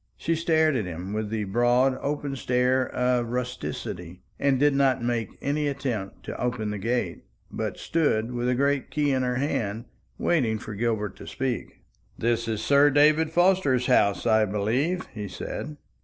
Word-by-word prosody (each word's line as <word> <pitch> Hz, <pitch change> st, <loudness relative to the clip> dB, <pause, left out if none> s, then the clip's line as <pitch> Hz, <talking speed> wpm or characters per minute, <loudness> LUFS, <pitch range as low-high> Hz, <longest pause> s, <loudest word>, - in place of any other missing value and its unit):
She 165 Hz, -, 0 dB
stared 160 Hz, -2 st, +2 dB
at 110 Hz, -5 st, 0 dB
him 90 Hz, +3 st, -6 dB
with 110 Hz, -1 st, -2 dB
the 110 Hz, -1 st, -2 dB
broad 120 Hz, +5 st, +2 dB
open 145 Hz, -1 st, -2 dB
stare 125 Hz, 0 st, +1 dB
of 125 Hz, -1 st, 0 dB
rusticity, 115 Hz, -8 st, -5 dB, 0.2 s
and 135 Hz, -2 st, +2 dB
did 145 Hz, 0 st, +4 dB
not 135 Hz, -3 st, +2 dB
make 120 Hz, -3 st, -1 dB
any 145 Hz, +1 st, 0 dB
attempt 130 Hz, -9 st, -4 dB
to -, -, -6 dB
open 120 Hz, -4 st, -1 dB
the 105 Hz, -, -4 dB
gate, 120 Hz, +5 st, -2 dB, 0.3 s
but -, -, -3 dB
stood 125 Hz, -8 st, 0 dB
with 120 Hz, 0 st, -1 dB
a 125 Hz, -, +2 dB
great 140 Hz, 0 st, +1 dB
key 145 Hz, -2 st, +1 dB
in 130 Hz, -1 st, +1 dB
her 125 Hz, -1 st, 0 dB
hand, 115 Hz, -5 st, -2 dB, 0.3 s
waiting 125 Hz, -10 st, +1 dB
for 110 Hz, 0 st, -8 dB
Gilbert 105 Hz, -2 st, -1 dB
to -, -, -11 dB
speak. 130 Hz, -2 st, -4 dB, 0.3 s
"This 115 Hz, 0 st, 0 dB
is 110 Hz, -2 st, -2 dB
Sir 140 Hz, +1 st, +5 dB
David 150 Hz, +3 st, +4 dB
Forster's 170 Hz, -7 st, +3 dB
house, 100 Hz, -5 st, +3 dB
I 110 Hz, -2 st, +4 dB
believe," 120 Hz, -, 0 dB
he 105 Hz, -3 st, -5 dB
said. 145 Hz, +9 st, -6 dB
125 Hz, 170 wpm, -26 LUFS, 110-140 Hz, 0.3 s, Sir